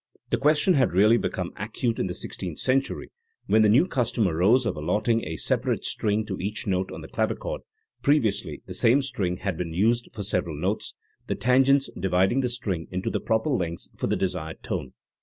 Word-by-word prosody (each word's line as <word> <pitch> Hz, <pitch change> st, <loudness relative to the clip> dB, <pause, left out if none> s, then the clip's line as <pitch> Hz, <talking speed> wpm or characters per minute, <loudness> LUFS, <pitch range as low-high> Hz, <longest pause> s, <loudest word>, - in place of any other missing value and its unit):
The -, -, +3 dB
question 150 Hz, +6 st, +4 dB
had 130 Hz, -, +2 dB
really 105 Hz, +5 st, +5 dB
become 90 Hz, -6 st, -3 dB
acute 115 Hz, +3 st, -2 dB
in -, -, 0 dB
the 90 Hz, -, -4 dB
sixteenth -, -, -6 dB
century, 135 Hz, +1 st, -1 dB, 0.3 s
when 110 Hz, -, +4 dB
the 105 Hz, -, +5 dB
new 130 Hz, +11 st, +5 dB
custom 120 Hz, -, 0 dB
arose 95 Hz, +10 st, +3 dB
of 115 Hz, -, -1 dB
allotting 105 Hz, +9 st, 0 dB
a 80 Hz, +1 st, -4 dB
separate -, -, -1 dB
string 105 Hz, 0 st, 0 dB
to 95 Hz, -3 st, -5 dB
each 105 Hz, +4 st, -3 dB
note 95 Hz, -2 st, -1 dB
on -, -, -7 dB
the -, -, -9 dB
clavichord; -, -, -2 dB, 0.4 s
previously 110 Hz, -, +1 dB
the -, -, -7 dB
same 130 Hz, +5 st, +4 dB
string 100 Hz, -10 st, -2 dB
had 95 Hz, -3 st, -3 dB
been 85 Hz, -2 st, -4 dB
used 115 Hz, +6 st, +2 dB
for 105 Hz, -, -6 dB
several 90 Hz, -5 st, -1 dB
notes, 95 Hz, +6 st, -2 dB, 0.3 s
the -, -, -1 dB
tangents 135 Hz, +2 st, +3 dB
dividing 95 Hz, +6 st, +2 dB
the 125 Hz, -2 st, +1 dB
string 100 Hz, -9 st, -2 dB
into 95 Hz, +5 st, -3 dB
the -, -, -1 dB
proper 110 Hz, +7 st, 0 dB
length 85 Hz, -9 st, -2 dB
for -, -, -2 dB
the -, -, +1 dB
desired 90 Hz, -4 st, -3 dB
tone. 65 Hz, -, -4 dB
105 Hz, 195 wpm, -26 LUFS, 90-125 Hz, 0.4 s, really